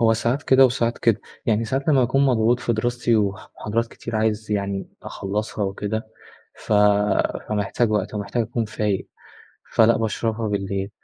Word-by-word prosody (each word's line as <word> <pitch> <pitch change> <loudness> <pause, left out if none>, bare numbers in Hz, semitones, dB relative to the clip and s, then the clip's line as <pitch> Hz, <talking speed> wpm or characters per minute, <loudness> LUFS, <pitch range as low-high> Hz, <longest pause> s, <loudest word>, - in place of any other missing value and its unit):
هو 115 -1 +5
ساعات 120 +6 0
كده 135 0 +6
وساعات 120 -1 -1
كده. 115 -4 +2 0.3
يعني 115 0 +2
ساعات 135 +6 -2
لمّا 140 -3 +5
باكون 135 +3 +2
مضغوط 120 -1 +2
في 120 - 0
دراستي 120 +1 +1
وح 100 0 -2
محاضرات 115 +3 -1
كتير 115 -1 -6
عايز 110 0 -1
يعني 100 -1 -2
أخلّصها 105 +1 -3
وكده، 105 +3 -3 0.5
ف - - -5 0.8
فمحتاج 105 +2 0
وقت 105 0 -1
ومحتاج 105 +3 -1
أكون 115 +1 -2
فايق. 105 -2 -2 0.6
فلأ 115 +1 +5
باشربها 110 0 -1
بالليل. 100 -1 -2
110 Hz, 150 wpm, -23 LUFS, 105-120 Hz, 0.8 s, كده